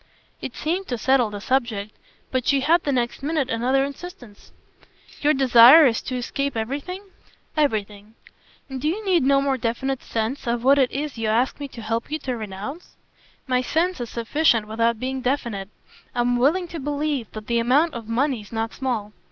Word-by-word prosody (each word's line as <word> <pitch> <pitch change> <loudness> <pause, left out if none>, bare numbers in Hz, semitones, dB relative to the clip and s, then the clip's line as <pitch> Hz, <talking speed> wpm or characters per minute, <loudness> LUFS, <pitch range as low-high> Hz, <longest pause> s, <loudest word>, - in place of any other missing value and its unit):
It 255 - -6
seemed 355 +5 -2
to 245 - -2
settle 255 -1 +2
the 205 -1 -6
subject, 220 -4 -1 0.4
but 255 -1 -1
she 275 -1 +3
had 330 +5 +3
the 285 - -1
next 240 -1 -1
minute 290 -2 -1
another 255 +4 +1
insistence. 280 - -10 0.7
"Your 300 +1 +3
desire 265 +3 +8
is 230 -4 +2
to 255 - -5
escape 275 +1 -2
everything?" 285 - -4 0.5
"Everything." 215 -7 -1 0.5
"And 265 -2 -6
do 300 - 0
you 410 +7 -2
need 370 -3 +3
no 275 +1 +3
more 270 -2 0
definite 245 +4 -2
sense 230 +4 -3
of 235 0 -1
what 275 +2 +5
it 260 -2 +3
is 285 -3 -4
you 225 - -1
ask 235 +6 +1
me 285 - -4
to 235 -4 -10
help 225 +1 -2
you 305 - -1
to 260 -4 -4
renounce?" 215 - -7 0.5
"My 255 -1 +1
sense 330 +4 0
is 235 - -4
sufficient 235 -1 +1
without 230 +1 0
being 260 +1 -3
definite. 235 -7 -2 0.5
I'm 245 0 +1
willing 325 +9 +2
to 335 - -6
believe 290 -3 -2
that 215 -1 -7
the 235 +1 +1
amount 280 +8 +3
of 230 -2 -7
money's 235 -3 -1
not 225 0 -3
small." 225 -6 -3
255 Hz, 185 wpm, -23 LUFS, 230-285 Hz, 0.7 s, desire